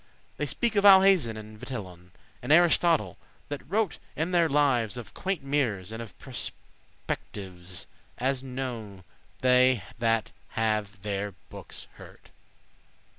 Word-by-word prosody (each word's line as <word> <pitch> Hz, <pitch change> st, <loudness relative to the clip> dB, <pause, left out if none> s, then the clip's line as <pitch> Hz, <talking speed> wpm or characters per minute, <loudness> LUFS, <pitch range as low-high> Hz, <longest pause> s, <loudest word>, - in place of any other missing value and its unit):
They -, -, -2 dB
speak 235 Hz, -3 st, 0 dB
of 200 Hz, -, +3 dB
Alhazen 190 Hz, -, +7 dB
and 110 Hz, 0 st, -10 dB
Vitellon,<16> 90 Hz, -9 st, -7 dB, 0.3 s
And -, -, -2 dB
Aristotle, 170 Hz, 0 st, +4 dB, 0.3 s
that 145 Hz, -1 st, -4 dB
wrote 205 Hz, 0 st, 0 dB, 0.2 s
in 160 Hz, +3 st, -1 dB
their 170 Hz, -2 st, +3 dB
lives 130 Hz, -6 st, +2 dB
Of 120 Hz, -, -8 dB
quainte* 190 Hz, -6 st, -2 dB
mirrors, 125 Hz, -10 st, 0 dB
and 115 Hz, +1 st, -5 dB
of 110 Hz, -6 st, -10 dB
prospectives, -, -, -3 dB, 0.8 s
*curious 90 Hz, -3 st, -6 dB, 0.3 s
As 130 Hz, +1 st, 0 dB
knowe 125 Hz, -7 st, -5 dB, 0.4 s
they 125 Hz, -3 st, +4 dB, 0.2 s
that 115 Hz, -1 st, +1 dB, 0.3 s
have 105 Hz, -3 st, -1 dB
their 100 Hz, -1 st, -3 dB, 0.2 s
bookes -, -, -6 dB
heard. -, -, -15 dB
125 Hz, 125 wpm, -28 LUFS, 105-150 Hz, 0.8 s, Alhazen